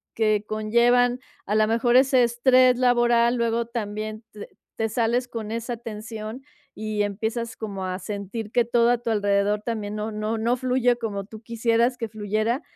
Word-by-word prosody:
que 215 -2 +1
conllevan, 240 +3 +2 0.3
a 210 - 0
lo 215 0 +4
mejor, 235 +2 +2
ese 260 -1 +5
estrés 250 +1 +4
laboral, 240 -1 +3
luego 235 -1 0
también 215 -1 -5
te 210 - -9 0.3
te 225 - -1
sales 240 +2 0
con 225 -3 -6
esa 230 +2 -3
tensión 220 +1 -7 0.3
y 215 0 -3
empiezas 220 +3 -3
como 200 -4 -5
a 185 0 -3
sentir 205 +3 -6
que 240 - +3
todo 235 0 +3
a 245 - +2
tu 240 - -4
alrededor 205 0 +1
también 215 -3 -3
no 215 +1 -3
no 215 +1 -2
no 235 +2 +1
fluye 250 -1 +2
como 205 -4 -4
tú 215 +1 -12
quisieras 230 +2 +1
que 230 - -3
fluyera. 215 +5 -1
225 Hz, 170 wpm, -24 LUFS, 215-240 Hz, 0.3 s, ese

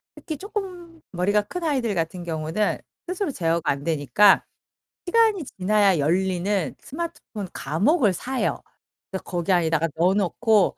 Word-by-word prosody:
특히 315 -4 -6
쪼끔 365 -4 -6
머리가 195 +4 +2
큰 355 +11 -6
아이들 260 -8 0
같은 170 +1 -2
경우는 165 +4 -1 0.3
스스로 365 -2 -1
제어가 165 - 0
안 140 0 -4
되니까 160 - +4 0.6
시간이 435 -2 +3 0.2
지나야 200 -2 +3
열리는 180 +2 0
스마트폰 290 - -6
감옥을 210 - +2
사요. 255 +8 -2 0.5
그래서 190 - -4
거기 175 +1 -2
안에다가 165 -2 +2
넣어 175 +3 +4
놓고 210 +1 +2
200 Hz, 320 characters per minute, -24 LUFS, -, 0.6 s, 되니까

